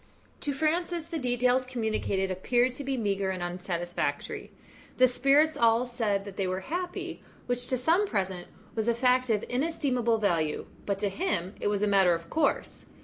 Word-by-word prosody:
To 290 - -2
Francis, 330 +3 0
the 330 -1 -4
details 250 0 +2
communicated 215 -5 -1
appeared 240 +7 +1
to 280 - -5
be 270 -1 -1
meagre 200 -4 0
and 185 -2 -3
unsatisfactory. 175 -1 -3 0.5
The 255 - +7
spirits 280 +5 +3
all 235 -2 +4
said 220 -5 -1
that 200 -1 -9
they 195 - 0
were 185 +1 -2
happy, 350 - -4 0.2
which 245 0 -2
to 255 - 0
some 335 +11 +2
present 190 - -2 0.3
was 220 0 -2
a 235 - +3
fact 255 +1 +3
of 215 -2 +1
inestimable 250 -4 +1
value, 165 -8 0 0.2
but 200 -1 0
to 205 - +1
him 195 - -2
it - - -1
was 205 0 +1
a - - +3
matter 190 -4 +5
of 165 0 -9
course. 320 - 0
235 Hz, 175 wpm, -28 LUFS, 195-265 Hz, 0.5 s, The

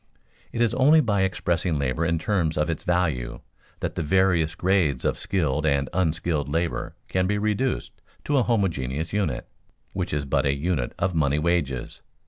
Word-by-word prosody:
It 115 - -2
is 120 -1 +3
only 140 +5 +5
by 105 -9 +2
expressing 90 -3 0
labor 70 +3 -1
in 85 0 +1
terms 85 -3 0
of 75 +2 +1
its 80 - -5
value 80 -9 0 0.4
that - - -2
the - - -3
various 85 -1 +2
grades 85 -9 +1
of - - 0
skilled 75 -6 0
and 70 -3 +1
unskilled 80 -4 0
labor 85 +3 -2
can 95 0 0
be 105 +1 +1
reduced 110 +5 -1 0.2
to 145 -2 +2
a - - +3
homogeneous 80 - -1
unit, 100 -1 -1 0.5
which 90 -2 -2
is 75 -1 -1
but 70 - +1
a 70 - +2
unit 70 -4 -1
of 95 - 0
money 75 -3 +2
wages. 75 -6 -1
85 Hz, 170 wpm, -25 LUFS, 75-95 Hz, 0.5 s, only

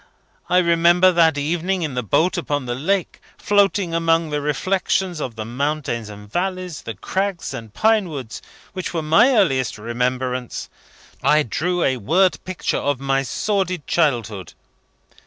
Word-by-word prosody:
I 180 - +3
remember, 175 +1 +5
that 165 -3 +3
evening 175 +5 -1
in 150 -4 -3
the 125 - -1
boat 160 - +1
upon 145 -6 -2
the 120 - -2
lake, 175 +8 -1 0.2
floating 200 -3 +2
among 165 -1 +1
the 150 0 -1
reflections 180 +4 0
of 125 -5 -4
the 110 -1 -5
mountains 125 -2 -2
and 105 0 -11
valleys, 180 - -3
the 115 - -6
crags 190 - -3
and 115 -2 -8
pine 215 - +2
woods, 135 -7 -7 0.3
which 185 -2 -5
were 160 - -1
my 165 +12 +5
earliest 145 - +2
remembrance, 125 +2 -3 0.5
I 150 0 +4
drew 175 - -1
a 130 -1 +1
word 175 - +2
picture 185 -1 -2
of 145 -3 -1
my 135 0 +1
sordid 185 +2 -1
childhood. 115 - -1
160 Hz, 150 wpm, -21 LUFS, 130-185 Hz, 0.5 s, remember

